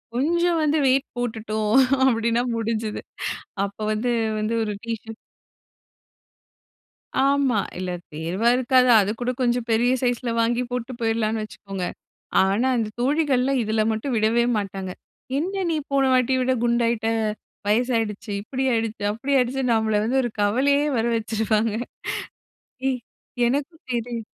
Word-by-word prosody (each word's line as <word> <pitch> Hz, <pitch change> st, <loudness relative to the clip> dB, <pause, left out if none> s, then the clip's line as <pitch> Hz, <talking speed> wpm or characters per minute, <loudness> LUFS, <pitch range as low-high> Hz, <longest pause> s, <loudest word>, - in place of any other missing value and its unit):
கொஞ்சம் 340 Hz, +5 st, +2 dB
வந்து 305 Hz, +1 st, +2 dB
வெயிட் 265 Hz, +1 st, +3 dB
போட்டுட்டோம் 220 Hz, -2 st, -2 dB, 0.3 s
அப்டின்னா 235 Hz, -1 st, +2 dB
முடிஞ்சுது. 225 Hz, -1 st, -2 dB, 0.6 s
அப்போ 200 Hz, +2 st, -6 dB
வந்து 225 Hz, +3 st, 0 dB, 0.3 s
வந்து 215 Hz, +2 st, -1 dB
ஒரு 210 Hz, -1 st, -2 dB
டீஷர்ட் 225 Hz, -1 st, -5 dB, 2.1 s
ஆமா. 275 Hz, -5 st, +3 dB, 0.2 s
இல்ல 185 Hz, 0 st, -3 dB, 0.2 s
தேர்வா 170 Hz, +9 st, 0 dB
இருக்காது. 255 Hz, 0 st, +4 dB
அதுக்கூட 225 Hz, +5 st, -1 dB
கொஞ்சம் 240 Hz, -1 st, +1 dB
பெரிய 235 Hz, +3 st, +3 dB
சைஸ்ல 245 Hz, -1 st, 0 dB
வாங்கி 235 Hz, +2 st, +1 dB
போட்டு 250 Hz, 0 st, -3 dB
போயிடலான்னு 225 Hz, -1 st, 0 dB
வச்சுக்கோங்க. 195 Hz, -3 st, -6 dB, 0.6 s
ஆனா 200 Hz, +7 st, +2 dB
அந்த 225 Hz, -2 st, 0 dB
தோழிகள்லாம் 270 Hz, -1 st, +2 dB
இதில 220 Hz, 0 st, +1 dB
மட்டும் 230 Hz, +3 st, -2 dB
விடவே 225 Hz, +2 st, +3 dB
மாட்டாங்க. 195 Hz, -2 st, -4 dB, 0.5 s
"என்ன 380 Hz, +5 st, -1 dB
நீ 320 Hz, -, +1 dB
போன 275 Hz, -1 st, +3 dB
வாட்டி 255 Hz, 0 st, +3 dB
விட 255 Hz, +1 st, +1 dB
குண்டாகிட்ட, 235 Hz, -1 st, +1 dB, 0.6 s
வயசாயிடுச்சு 225 Hz, -2 st, 0 dB
இப்டி 265 Hz, +5 st, -3 dB
ஆயிடுச்சு, 225 Hz, -2 st, -2 dB
அப்டி 265 Hz, +7 st, -2 dB
ஆயிடுச்சுனு" 250 Hz, 0 st, +1 dB
நம்மள 220 Hz, -1 st, +2 dB
வந்து 260 Hz, +4 st, +2 dB
ஒரு 240 Hz, -, -2 dB
கவலையே 275 Hz, +8 st, +3 dB
வர 225 Hz, -, +1 dB
வச்சுருவாங்க. 220 Hz, 0 st, 0 dB, 1.2 s
ஏய் 255 Hz, -1 st, -1 dB, 0.5 s
எனக்கும் 290 Hz, +6 st, -3 dB
தெரி 235 Hz, -1 st, -3 dB
230 Hz, 125 wpm, -23 LUFS, 215-255 Hz, 2.1 s, இருக்காது